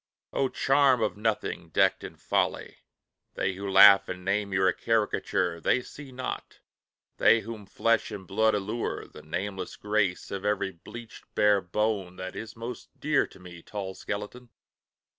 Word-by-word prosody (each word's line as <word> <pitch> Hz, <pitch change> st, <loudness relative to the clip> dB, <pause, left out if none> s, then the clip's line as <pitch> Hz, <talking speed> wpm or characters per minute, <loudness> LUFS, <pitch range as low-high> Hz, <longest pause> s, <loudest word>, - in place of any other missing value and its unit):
O 135 Hz, -1 st, +1 dB
charm 135 Hz, -4 st, +3 dB
of 110 Hz, -, 0 dB
nothing 110 Hz, 0 st, -2 dB
decked -, -, +2 dB
in -, -, -8 dB
folly! -, -, -1 dB, 0.6 s
they 95 Hz, -, 0 dB
Who 100 Hz, +1 st, -5 dB
laugh 100 Hz, 0 st, +8 dB
and 90 Hz, 0 st, -6 dB
name 100 Hz, +1 st, 0 dB
you 95 Hz, 0 st, +2 dB
a 90 Hz, -, +4 dB
Caricature, 105 Hz, -6 st, 0 dB
They 125 Hz, -, +2 dB
see 145 Hz, 0 st, -11 dB
not, 130 Hz, 0 st, -5 dB, 0.6 s
they 115 Hz, -, +5 dB
whom 110 Hz, -2 st, -8 dB
flesh 115 Hz, +3 st, +1 dB
and 95 Hz, -2 st, -7 dB
blood 110 Hz, +3 st, +2 dB
allure, 105 Hz, +4 st, -3 dB
The -, -, -13 dB
nameless 90 Hz, +4 st, -4 dB
grace 105 Hz, -3 st, -1 dB
of 100 Hz, -1 st, -4 dB
every 105 Hz, -2 st, 0 dB
bleached, 115 Hz, +7 st, -11 dB
bare 105 Hz, -1 st, +4 dB
bone 95 Hz, 0 st, -1 dB
That 95 Hz, 0 st, -7 dB
is 110 Hz, -1 st, -7 dB
most 115 Hz, +2 st, -8 dB
dear 150 Hz, -1 st, +2 dB
to -, -, -17 dB
me, 90 Hz, -1 st, -11 dB
tall 95 Hz, -1 st, -6 dB
skeleton! 105 Hz, +6 st, -6 dB
105 Hz, 160 wpm, -28 LUFS, 95-115 Hz, 0.6 s, laugh